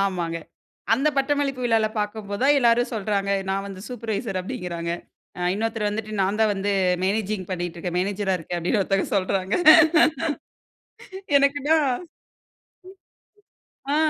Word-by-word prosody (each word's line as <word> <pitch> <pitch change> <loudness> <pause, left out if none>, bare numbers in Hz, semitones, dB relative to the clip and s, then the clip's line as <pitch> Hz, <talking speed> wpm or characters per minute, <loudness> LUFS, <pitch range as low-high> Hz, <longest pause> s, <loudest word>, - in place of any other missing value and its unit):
ஆமாங்க. 175 -4 -1 0.6
அந்த 270 +6 +2
பட்டமளிப்பு 275 -1 0
விழால 225 -2 +3
பார்க்கும்போது 210 0 -4
தான் 285 +2 +5
எல்லாரும் 240 0 +3
சொல்றாங்க, 200 -1 -1 0.2
நான் 195 +1 -1
வந்து 190 -1 -9
சூப்பர்வைசர் 220 -4 -3
அப்டின்கிறாங்க, 180 -6 -4 0.5
அ - - -5
இன்னொருத்தர் 220 0 -1
வந்துட்டு 215 0 -5
நான் 200 +3 0
தான் 215 -1 +3
வந்து 200 +1 -1 0.3
மேனேஜிங் 200 -1 -1
பண்ணிட்டு 175 -2 -3
இருக்கேன், 175 +1 -4
மேனேஜர் 195 +1 -1
அ 185 - 0
இருக்கேன் 175 +2 -5
அப்டினு 180 +6 0
ஒருத்தங்க 195 0 0
சொல்றாங்க. 190 0 0 1.8
எனக்குன்னா 285 +3 +2 2.2
ஆ - - +2
205 Hz, 125 wpm, -24 LUFS, 190-230 Hz, 2.2 s, தான்